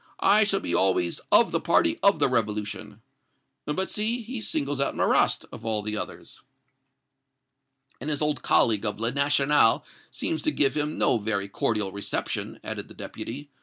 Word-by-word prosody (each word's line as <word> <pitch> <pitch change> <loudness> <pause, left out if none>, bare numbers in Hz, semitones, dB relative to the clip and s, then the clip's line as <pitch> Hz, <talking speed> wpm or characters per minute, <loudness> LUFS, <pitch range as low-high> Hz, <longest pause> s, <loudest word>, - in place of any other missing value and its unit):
I 210 +2 +6
shall 195 -1 0
be 85 - -3
always 90 -1 +1
of - - +5
the - - 0
party 85 - +2
of 200 0 +4
the - - +3
revolution.' 105 -2 -3 0.6
But 185 +6 -2
see, 230 +3 -1
he 235 +1 -6
singles 145 -7 -2
out 140 - 0
Marrast, - - +2
of - - -10
all 110 -2 -2
others!" 105 0 -7 1.6
"And 140 - -5
his 150 -2 -1
old 150 -1 0
colleague 110 -3 +3
of 105 -1 -2
'Le 115 +1 -1
National' 140 -2 +3 0.2
seems 155 - -3
to 155 - 0
give 140 -1 +2
him 150 0 -2
no 115 - +2
very 100 -2 -2
cordial 105 0 -1
reception," 100 +1 -4
added - - -5
the - - -15
Deputy. 140 +5 -8
130 Hz, 165 wpm, -26 LUFS, 105-150 Hz, 1.6 s, I